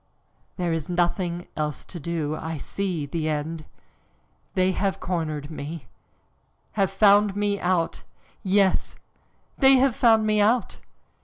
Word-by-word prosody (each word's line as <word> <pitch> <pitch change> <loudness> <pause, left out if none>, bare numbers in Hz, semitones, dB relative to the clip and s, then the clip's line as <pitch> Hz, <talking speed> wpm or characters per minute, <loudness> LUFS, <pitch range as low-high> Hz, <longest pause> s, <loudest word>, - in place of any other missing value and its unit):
"There 175 -3 -1
is 160 -1 -3
nothing 175 0 -1
else 150 -2 -3
to 175 - -9
do 155 -1 -2
I 160 0 -5
see 180 -1 -3
the 155 +2 -2
end. 155 +1 -3 0.9
They 185 0 +3
have 195 +1 -1
cornered 155 -4 -3
me, 155 0 -7 0.9
have 195 -3 +1
found 200 0 +4
me 205 0 0
out! 175 -2 0 0.4
Yes, 195 0 +2 0.6
they 270 -1 +7
have 260 -2 +3
found 225 -2 +4
me 215 -1 +2
out!" 230 +3 +1
180 Hz, 130 wpm, -24 LUFS, 160-205 Hz, 0.9 s, they